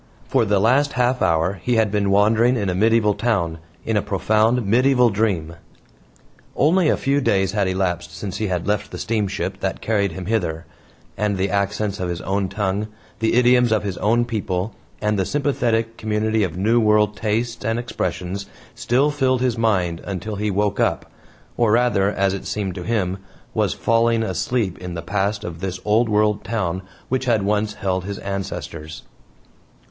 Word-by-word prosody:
For 130 Hz, -4 st, +2 dB
the 100 Hz, -1 st, +2 dB
last 135 Hz, +7 st, +3 dB
half 125 Hz, 0 st, +1 dB
hour 85 Hz, +4 st, +1 dB
he 125 Hz, +5 st, 0 dB
had 110 Hz, -3 st, +2 dB
been 100 Hz, -1 st, +1 dB
wandering 110 Hz, +5 st, +4 dB
in 100 Hz, -3 st, -1 dB
a -, -, 0 dB
medieval 110 Hz, +2 st, +3 dB
town, 95 Hz, -9 st, -1 dB, 0.3 s
in 110 Hz, -, 0 dB
a 105 Hz, -, +3 dB
profound 110 Hz, +4 st, +1 dB
medieval 125 Hz, +3 st, +4 dB
dream. 95 Hz, -6 st, -1 dB, 1.0 s
Only 165 Hz, +4 st, +3 dB
a -, -, +2 dB
few 140 Hz, +1 st, +1 dB
days 95 Hz, -6 st, +2 dB
had 105 Hz, -3 st, 0 dB
elapsed 90 Hz, -2 st, -1 dB
since 100 Hz, -3 st, -5 dB
he 110 Hz, -, -1 dB
had 90 Hz, -3 st, -2 dB
left 105 Hz, 0 st, -1 dB
the -, -, -7 dB
steamship 100 Hz, -3 st, -2 dB
that 95 Hz, -1 st, -2 dB
carried 100 Hz, -5 st, 0 dB
him 90 Hz, +1 st, -6 dB
hither; 85 Hz, -6 st, -1 dB, 0.5 s
and 105 Hz, -2 st, 0 dB
the 95 Hz, +1 st, 0 dB
accents 100 Hz, 0 st, -1 dB
of 90 Hz, -1 st, -2 dB
his 85 Hz, -1 st, -3 dB
own 95 Hz, 0 st, -1 dB
tongue, 100 Hz, +1 st, -1 dB, 0.3 s
the 110 Hz, 0 st, +1 dB
idioms 125 Hz, -1 st, +4 dB
of 110 Hz, -1 st, +2 dB
his 95 Hz, -3 st, -4 dB
own 115 Hz, +3 st, +2 dB
people, 100 Hz, -3 st, -2 dB, 0.3 s
and 105 Hz, -1 st, +1 dB
the -, -, +2 dB
sympathetic 115 Hz, -4 st, 0 dB
community 110 Hz, 0 st, 0 dB
of 90 Hz, -3 st, -3 dB
New 110 Hz, +5 st, +3 dB
World 105 Hz, -1 st, +3 dB
tastes 115 Hz, +3 st, -2 dB
and 115 Hz, +1 st, 0 dB
expressions 100 Hz, -5 st, -3 dB, 0.3 s
still 135 Hz, +5 st, +1 dB
filled 130 Hz, -3 st, +1 dB
his 125 Hz, -3 st, +1 dB
mind 95 Hz, -7 st, 0 dB
until 100 Hz, +2 st, -5 dB
he 105 Hz, +1 st, -1 dB
woke 100 Hz, +1 st, 0 dB
up, -, -, 0 dB, 0.5 s
or 115 Hz, -3 st, +3 dB
rather, 115 Hz, -5 st, +3 dB
as 100 Hz, -2 st, +1 dB
it 100 Hz, -, -5 dB
seemed 100 Hz, -3 st, -2 dB
to 90 Hz, -, -7 dB
him, 95 Hz, -1 st, -1 dB, 0.3 s
was -, -, 0 dB
falling 115 Hz, 0 st, +2 dB
asleep 105 Hz, 0 st, -1 dB
in 90 Hz, -1 st, -6 dB
the 85 Hz, -, -5 dB
past 100 Hz, +3 st, -1 dB
of 80 Hz, -2 st, -6 dB
this 95 Hz, 0 st, -4 dB
Old 110 Hz, +3 st, +3 dB
World 105 Hz, 0 st, +2 dB
town 95 Hz, -4 st, -2 dB, 0.3 s
which 130 Hz, +1 st, -1 dB
had 115 Hz, -5 st, +2 dB
once 105 Hz, +1 st, 0 dB
held 95 Hz, -1 st, -2 dB
his 100 Hz, 0 st, -4 dB
ancestors. 85 Hz, -5 st, -6 dB
105 Hz, 180 wpm, -21 LUFS, 95-115 Hz, 1.0 s, wandering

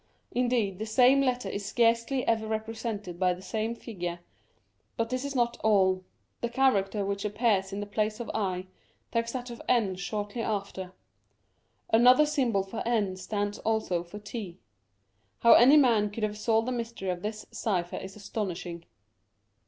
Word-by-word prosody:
Indeed 240 Hz, -6 st, 0 dB
the 220 Hz, -, -3 dB
same 255 Hz, +5 st, +5 dB
letter 250 Hz, -2 st, 0 dB
is 200 Hz, -, -4 dB
scarcely 230 Hz, +4 st, +1 dB
ever 220 Hz, -1 st, +1 dB
represented 220 Hz, -4 st, -4 dB
by 180 Hz, -1 st, +2 dB
the 180 Hz, -, -12 dB
same 220 Hz, +2 st, -2 dB
figure; 175 Hz, -7 st, -5 dB, 0.8 s
but 230 Hz, +1 st, -1 dB
this 255 Hz, +1 st, -1 dB
is 280 Hz, 0 st, -4 dB
not 240 Hz, -1 st, +1 dB
all: 190 Hz, -3 st, +3 dB, 0.4 s
the 235 Hz, -, -1 dB
character 210 Hz, -6 st, +2 dB
which 200 Hz, 0 st, -2 dB
appears 210 Hz, -2 st, +1 dB
in 200 Hz, +1 st, -4 dB
the -, -, -3 dB
place 215 Hz, +2 st, -1 dB
of 235 Hz, -, -5 dB
i 185 Hz, -3 st, -1 dB, 0.5 s
takes 230 Hz, 0 st, 0 dB
that 250 Hz, -1 st, -5 dB
of 235 Hz, -, -8 dB
n 225 Hz, -6 st, +3 dB
shortly 205 Hz, +5 st, -4 dB
after; 200 Hz, -4 st, -3 dB, 1.0 s
another 250 Hz, +6 st, +7 dB
symbol 255 Hz, -10 st, +1 dB
for 195 Hz, +4 st, -6 dB
n 215 Hz, -5 st, 0 dB
stands 205 Hz, +2 st, -3 dB
also 220 Hz, -6 st, 0 dB
for 175 Hz, +4 st, -10 dB
/. 205 Hz, -4 st, -6 dB, 0.9 s
How 235 Hz, -, +9 dB
any 265 Hz, +6 st, +8 dB
man 230 Hz, -7 st, +4 dB
could 215 Hz, +2 st, -6 dB
have 210 Hz, 0 st, 0 dB
solved 225 Hz, +2 st, +1 dB
the -, -, 0 dB
mystery 230 Hz, -5 st, -4 dB
of 175 Hz, -1 st, -5 dB
this 215 Hz, +1 st, -5 dB
cypher 180 Hz, -5 st, -2 dB
is 190 Hz, 0 st, -7 dB
astonishing. 180 Hz, -5 st, -5 dB
215 Hz, 160 wpm, -28 LUFS, 195-235 Hz, 1.0 s, How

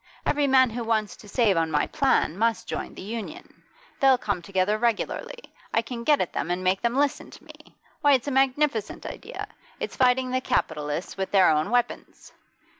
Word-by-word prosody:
Every 290 Hz, -1 st, +2 dB
man 260 Hz, -2 st, +5 dB
who 235 Hz, +1 st, -4 dB
wants 220 Hz, -2 st, -1 dB
to 210 Hz, -, -14 dB
save 210 Hz, -4 st, +2 dB
on 165 Hz, -1 st, +1 dB
my 150 Hz, -1 st, +1 dB
plan 275 Hz, -, +1 dB
must 225 Hz, 0 st, 0 dB
join -, -, -5 dB
the -, -, -8 dB
Union. 230 Hz, -, -8 dB, 0.4 s
They'll 270 Hz, -1 st, +5 dB
come 200 Hz, -6 st, -2 dB
together 195 Hz, +3 st, 0 dB
regularly; 235 Hz, -, -1 dB, 0.4 s
I -, -, +3 dB
can 235 Hz, -2 st, -6 dB
get 295 Hz, +2 st, +4 dB
at 180 Hz, -, -2 dB
them 155 Hz, -, -3 dB
and 180 Hz, +1 st, -2 dB
make 185 Hz, +1 st, +1 dB
them 235 Hz, +1 st, 0 dB
listen 285 Hz, 0 st, 0 dB
to -, -, -15 dB
me. -, -, -16 dB, 0.3 s
Why, 290 Hz, -1 st, +5 dB
it's 260 Hz, 0 st, +1 dB
a -, -, -1 dB
magnificent 265 Hz, -4 st, 0 dB
idea! -, -, -7 dB, 0.3 s
It's -, -, -4 dB
fighting 255 Hz, 0 st, +3 dB
the 255 Hz, 0 st, 0 dB
capitalists 160 Hz, -10 st, -2 dB
with 190 Hz, 0 st, -2 dB
their 190 Hz, -4 st, +5 dB
own 155 Hz, +2 st, +1 dB
weapons! 245 Hz, 0 st, -2 dB
230 Hz, 190 wpm, -25 LUFS, 190-260 Hz, 0.4 s, man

